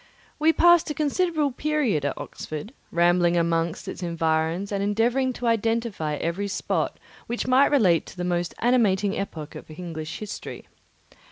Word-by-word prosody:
We 315 +2 +5
passed 345 0 +5
a 300 - -3
considerable 310 -1 +1
period 255 - 0
at 145 - -2
Oxford, 155 - -7 0.2
rambling 175 0 +3
among 165 0 +2
its 170 - -8
environs 165 +2 0
and 200 -1 -1
endeavouring 235 +6 +1
to 245 - -6
identify 225 -8 0
every 170 +7 -2
spot 200 - -2 0.3
which 240 +1 -2
might 255 +3 +5
relate 195 - +3
to - - -12
the 180 - -3
most 175 -1 -1
animating 210 -5 +3
epoch 160 -7 -5
of - - -10
English 160 -1 -6
history. 210 -2 -7
200 Hz, 150 wpm, -25 LUFS, 170-245 Hz, 0.3 s, We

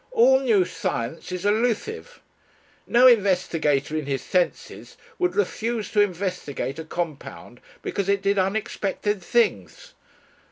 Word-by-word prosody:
All 455 - +5
new 225 -8 +3
science 120 +2 -4
is 180 +1 -4
elusive. 245 - -1 0.7
No 245 +2 +5
investigator 180 - +3
in 155 -3 -3
his 135 -2 -2
senses 180 -1 -2 0.2
would 360 0 0
refuse 220 +2 -2
to 210 - +3
investigate 180 -7 -3
a - - -4
compound 155 -7 -6 0.2
because 200 -1 -2
it 200 -1 +1
did 200 0 +2
unexpected 205 0 -2
things. 175 - -1
195 Hz, 120 wpm, -24 LUFS, 165-225 Hz, 0.7 s, All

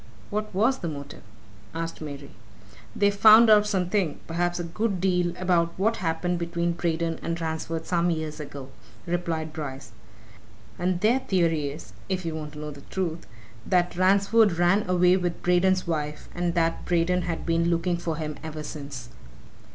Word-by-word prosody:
"What 215 +1 -2
was 230 +8 +2
the 175 - -4
motive?" 140 -2 -7 0.5
asked 165 0 -4
Mary. 140 -2 -7 0.6
"They've 205 0 +3
found 220 +3 +8
out 210 -1 +6
something 185 -4 0
perhaps 175 +1 -1
a - - -2
good 195 +3 -2
deal 180 -2 +1
about 175 -2 +1
what 220 +4 +1
happened 175 +1 -1
between 170 0 -1
Braden 165 -1 -1
and 170 0 -3
Ransford 160 0 -3
some 175 0 +1
years 160 -2 -3
ago," 140 -3 -8 0.4
replied 165 -3 -2
Bryce. 135 -6 -6 0.9
"And 180 0 0
their 230 +5 +4
theory 165 - +1
is 145 +3 -10 0.2
if 185 -2 -2
you 165 - -2
want 155 -1 -6
to 150 - -9
know 150 0 -5
the 140 -1 -11
truth 170 0 -4 0.4
that 180 +5 +1
Ransford 200 +3 +4
ran 175 +4 +2
away 180 0 +4
with 175 -2 -3
Braden's 185 +1 +3
wife, 150 -3 -3
and 175 -1 -1
that 165 -1 +1
Braden 175 +1 +2
had 165 -2 -4
been 170 0 +1
looking 170 +1 +1
for 170 -2 -3
him 150 -1 -5
ever 155 -1 -6
since." 140 -6 -7
170 Hz, 165 wpm, -26 LUFS, 160-185 Hz, 0.9 s, found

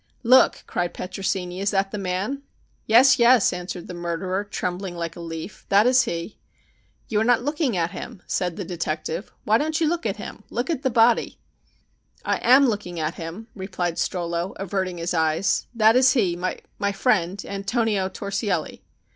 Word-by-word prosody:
"Look," 255 +2 +5
cried 175 -1 -2
Petrosini; 185 -1 -3
"is 200 - +1
that 195 -1 0
the 210 - -4
man?" 195 +9 -2 0.5
"Yes, 255 +4 +6
yes," 235 -4 +5
answered 180 0 -6
the - - -7
murderer, 175 +3 -2
trembling 185 -2 -4
like 165 -1 -4
a - - -10
leaf. 165 +3 -7
"That 200 +2 +5
is 255 +1 +5
he." 170 0 -5 0.7
"You 210 - 0
are - - +3
not 240 0 +3
looking 290 - 0
at 170 0 0
him," 225 -7 -8
said 180 -2 -1
the 195 - -5
detective. 165 +1 -4
"Why 220 +2 +3
don't 310 +2 -1
you 325 - +2
look 335 -6 -1
at 200 - -3
him. 210 0 -8
Look 240 +8 -2
at 300 -6 -2
the 265 - +1
body." 230 -1 +3 0.9
"I - - +1
am 260 +3 +6
looking 200 -6 -3
at 155 +1 -1
him," 175 +8 -8
replied 185 -4 -3
Strollo, 170 0 -2
averting 190 -2 -3
his 170 +1 -2
eyes. 160 +3 +1
"That 220 0 +5
is 255 0 +5
he 195 -9 +1
my 185 +3 -3
friend 195 -4 +1
Antonio 200 -1 0
Torsielli." 200 -4 -3
195 Hz, 170 wpm, -24 LUFS, 175-230 Hz, 0.9 s, Yes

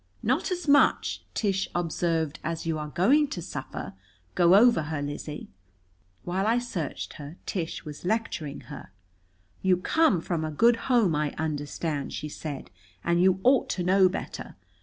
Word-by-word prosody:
"Not - - +1
as 360 -3 -3
much," 285 0 +4
Tish 195 -3 0
observed, 165 -2 -1
"as 165 +1 -3
you 160 -1 -1
are 150 - -4
going 265 - +3
to 195 - -5
suffer. 140 - -6 0.4
Go 175 +1 +5
over 235 -2 +6
her, 155 -2 -2
Lizzie." 145 +1 -5 0.8
While 190 +3 -1
I 230 +2 +3
searched 195 - -4
her, 145 +3 -8
Tish 170 -4 -4
was 150 -1 -8
lecturing 180 -8 -2
her. 145 -9 -10 0.7
"You 185 -1 +3
come 215 - +3
from 165 -1 -2
a 155 - -2
good 230 - +2
home, 225 -10 +4
I 150 0 -1
understand," 150 -1 -3
she 150 - -4
said, 145 -2 -7 0.3
"and 170 0 +2
you 185 0 +4
ought 260 +1 +4
to 180 - -1
know 185 +1 +5
better. 185 - -6
175 Hz, 160 wpm, -27 LUFS, 150-200 Hz, 0.8 s, over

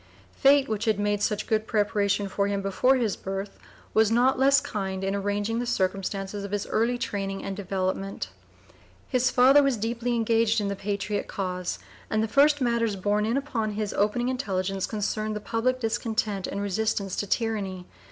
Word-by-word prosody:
Fate, 275 0 +4
which 220 0 -2
had 220 -3 +2
made 205 0 0
such 210 0 0
good 220 0 0
preparation 205 -1 +1
for 200 +1 0
him 200 -1 -1
before 225 +7 +3
his 230 -6 0
birth, 195 +1 -5 0.3
was 220 -1 +4
not 250 +3 +3
less 275 +1 +5
kind 195 -8 -4
in 195 0 0
arranging 205 +3 -1
the 245 - -2
circumstances 195 -1 -2
of 200 - -5
his 205 0 -2
early 235 +3 +1
training 195 -4 -3
and 195 - -4
development. 195 - -3 0.8
His 255 0 +2
father 265 +3 +6
was 275 -4 +1
deeply 235 +2 -1
engaged 225 0 +2
in 205 -1 -1
the 200 - -2
patriot 200 +1 -3
cause, 180 -2 -3 0.3
and 215 0 +1
the - - 0
first 290 +5 +4
matters 235 -3 +1
borne 205 +2 0
in 235 +4 +1
upon 230 -7 -2
his 210 -1 -3
opening 240 +5 +1
intelligence 195 -7 -2
concerned 215 0 -2
the - - -2
public 240 +4 -1
discontent 220 -4 -1
and 200 - -4
resistance 200 -1 -1
to 205 - -2
tyranny. 200 -5 -2
210 Hz, 175 wpm, -26 LUFS, 195-235 Hz, 0.8 s, father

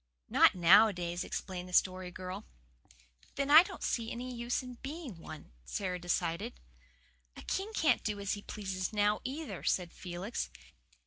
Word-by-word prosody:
"Not - - +6
nowadays," 180 -1 +5
explained 180 -1 -5
the - - -11
Story 185 0 +2
Girl. 185 +3 -7 0.9
"Then 280 +1 0
I 310 +2 +12
don't 360 - -7
see 230 -1 -1
any 250 +1 -5
use 240 +1 -2
in 250 -1 -9
being 275 - -7
one," 155 -1 -10
Sara 180 - -3
decided. 170 - -2 0.8
"A - - -9
king 395 +3 -2
can't 320 -7 +3
do 210 -1 -2
as 200 -1 -1
he 205 - -5
pleases 190 -3 -4
now, 210 0 +2
either," 285 +4 -5
said 175 -2 0
Felix. 185 +5 -4
200 Hz, 150 wpm, -32 LUFS, 180-245 Hz, 0.9 s, I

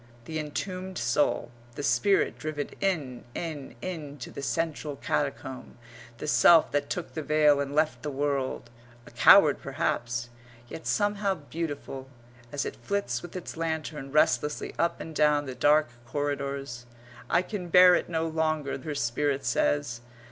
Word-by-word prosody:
the 160 -1 -4
entombed 185 +5 -4
soul, 120 +1 +1 0.2
the - - -5
spirit 195 +7 +2
driven 150 -2 -4
in, 150 -11 -1
in, 155 -5 -5
in 155 -6 -5
to 120 - -8
the - - -7
central 155 -1 -2
catacomb; 130 -3 -3 0.4
the - - -6
self 160 +2 +6
that 145 0 -1
took 175 -2 -4
the 160 - -3
veil 150 -1 +4
and 140 0 -3
left 155 0 +1
the 150 - -3
world 135 -4 -2 0.3
a - - -13
coward - - +7
perhaps, 120 0 -2 0.4
yet 160 - -8
somehow 205 -1 +1
beautiful, 145 -4 -6 0.4
as 145 - -2
it - - -5
flits 200 0 -2
with 175 0 -10
its 180 - -6
lantern 160 -4 -3
restlessly 150 0 +1
up 170 0 +1
and 160 - -7
down 150 -1 +3
the 130 - -5
dark 150 +3 +3 0.2
corridors. 140 -4 -3 0.4
"I 180 - +3
can 185 -2 -5
bear 180 +1 +8
it 175 - +1
no 165 -1 0
longer," 155 -3 -1
her 150 +3 -5
spirit 140 +2 0
says. 120 0 0
150 Hz, 150 wpm, -28 LUFS, 140-165 Hz, 0.4 s, bear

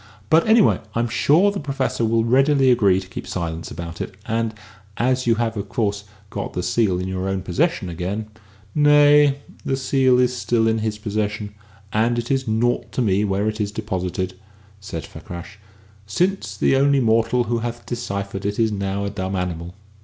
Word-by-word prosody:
"But, 165 +4 +5
anyway, 220 -1 +5 0.2
I'm 120 +1 +1
sure 165 - +4
the 200 - -4
Professor 135 -4 -2
will 115 0 +2
readily 135 +2 +4
agree 100 -6 +4
to 95 - -10
keep 95 - -8
silence 85 -2 -4
about 85 +1 -7
it; 95 - -5
and, 115 -1 -1 0.4
as 130 +1 +1
you 115 - +4
have 115 0 -1
of 100 -1 -5
course, 105 -2 -1 0.3
got - - -4
the 90 - -2
seal 105 -5 +1
in 90 - -3
your 95 0 -2
own 95 -1 -2
possession 130 - 0
again 90 +5 -3 0.3
" 100 -1 -28 0.2
"Nay; 145 -1 +6 0.3
the 135 - -1
seal 130 -1 +3
is 125 0 +2
still 115 -2 +1
in 110 0 +1
his 110 -1 -2
possession, 105 0 -3 0.4
and 115 +3 +2
it 120 +2 -2
is 135 -2 0
naught 115 +3 0
to - - 0
me 100 -1 +2
where 100 +1 0
it 110 0 -2
is 100 -1 -1
deposited," 95 -3 -3 0.5
said 85 -6 -6
Fakrash, 90 +4 -10 0.5
"since 110 - -1
the 135 - +3
only 140 +1 +4
mortal 115 +1 +2
who 120 0 -1
hath 120 0 -5
deciphered 100 -5 -4
it 100 +1 -2
is 115 -1 +2
now 100 0 -2
a 100 - -3
dumb 95 -1 -3
animal." 90 -1 -4
110 Hz, 185 wpm, -22 LUFS, 95-125 Hz, 0.5 s, Nay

